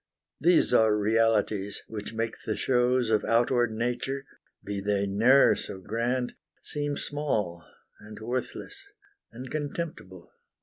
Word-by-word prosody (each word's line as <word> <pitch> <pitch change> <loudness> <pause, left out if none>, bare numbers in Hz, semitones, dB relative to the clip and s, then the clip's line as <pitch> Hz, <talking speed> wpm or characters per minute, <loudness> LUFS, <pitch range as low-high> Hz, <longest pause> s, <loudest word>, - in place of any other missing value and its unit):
These 170 -5 +4
are 110 -3 +5
realities, 105 -2 +1
which 105 -2 -6
make 115 0 -2
the 110 - -2
shows 125 -2 +2
Of 105 -2 +3
outward 120 0 +2
Nature, 125 +4 -2 0.4
be 100 -1 -4
they 100 0 0
ne'er 115 +8 +5
so - - -5
grand, 120 +6 -1 0.3
Seem 145 -1 -2
small, 105 - -2 0.4
and 105 +1 -11
worthless, 130 - -5 0.4
and 125 +2 -9
contemptible. 145 - -5
115 Hz, 120 wpm, -28 LUFS, 105-130 Hz, 0.4 s, are